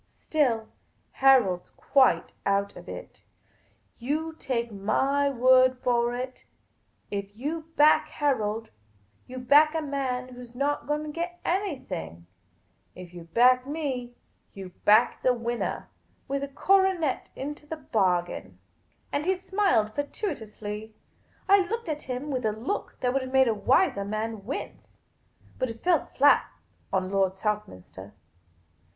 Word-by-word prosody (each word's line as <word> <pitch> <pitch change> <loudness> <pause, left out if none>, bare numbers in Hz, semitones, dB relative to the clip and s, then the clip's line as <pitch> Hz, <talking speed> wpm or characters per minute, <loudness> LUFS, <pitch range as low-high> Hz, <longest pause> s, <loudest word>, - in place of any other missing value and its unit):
Still, 245 -8 0 0.4
Harold 245 -10 +4
's - - -25
quite 270 -2 +2
out 200 0 0
of - - -11
it. - - -9 0.8
You 305 +6 -2
take 240 -6 -3
my 270 +8 +1
word 255 0 +4
for 240 -1 +1
it; 255 +1 -6 0.7
if 200 0 -4
you 310 +5 -4
back 300 +1 +5
Harold, 225 -6 -1 0.6
you 255 - -8
back 295 +5 +5
a 320 - 0
man 260 -3 -2
who 250 0 -10
's 240 0 -15
not 285 +3 -1
going 295 +1 -1
to 305 - -6
get 345 +2 -5
anything; 265 - -3 0.7
while 180 - -8
if 175 - -19
you 175 -1 -10
back 250 +7 +4
me, 265 -5 -4 0.4
you 190 -2 -8 0.2
back 215 +4 +5
the 250 -1 +3
winnah, 235 0 -3 0.4
with 275 0 -2
a - - -2
coronet 365 0 +1
into 295 +2 -6
the 320 - -5
bargain." 180 - -1 0.5
And 290 +4 -2
he 380 0 +2
smiled 370 - +1
fatuously. 220 - -5 0.5
I 400 +1 +7
looked 460 -4 -4
at 300 -1 -3
him 255 +3 -5
with 255 -2 -2
a 215 - +1
look 230 - -4
that 250 -1 +1
would 270 - +1
have 260 0 -6
made 265 -1 +5
a 230 - +2
wiser 250 - +2
man 215 0 -4
wince. 275 - -7 0.6
But 255 - 0
it 230 0 -9
fell 345 -4 +2
flat 285 +1 +4 0.4
on 190 -1 -1
Lord 195 -1 +1
Southminster. 190 - -5
255 Hz, 145 wpm, -27 LUFS, 215-290 Hz, 0.8 s, I